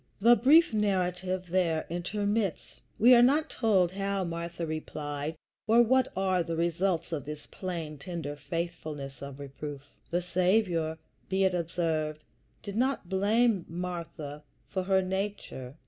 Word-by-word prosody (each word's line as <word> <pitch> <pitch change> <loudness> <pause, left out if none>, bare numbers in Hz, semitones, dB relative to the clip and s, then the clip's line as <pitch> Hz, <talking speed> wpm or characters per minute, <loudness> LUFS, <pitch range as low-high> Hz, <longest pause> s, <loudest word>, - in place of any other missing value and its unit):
The 235 +4 +7
brief 290 +3 +5
narrative 185 -3 0
there 170 -4 +1
intermits; 200 +3 -2 0.2
we 245 +4 +7
are 240 - +8
not 295 +6 +3
told 195 -7 +3
how 195 0 -1
Martha 170 0 -4
replied, 155 -1 -4 0.3
or 230 +2 +6
what 260 +2 +3
are 185 -1 +2
the 165 0 -3
results 170 +1 0
of 150 -5 -2
this 150 0 -7
plain, 165 -5 -5
tender 160 -3 -5
faithfulness 150 -4 -5
of 140 0 -8
reproof. 140 0 -7 0.3
The 175 +1 0
Saviour, 180 -3 +1 0.3
be 190 +1 +2
it 190 -1 +3
observed, 160 -3 -1 0.4
did 200 -1 -6
not 255 -7 0
blame 205 +1 +2
Martha 170 -4 -5 0.3
for 190 - -2
her 190 0 +2
nature. 190 -9 -4
180 Hz, 135 wpm, -29 LUFS, 160-200 Hz, 0.4 s, are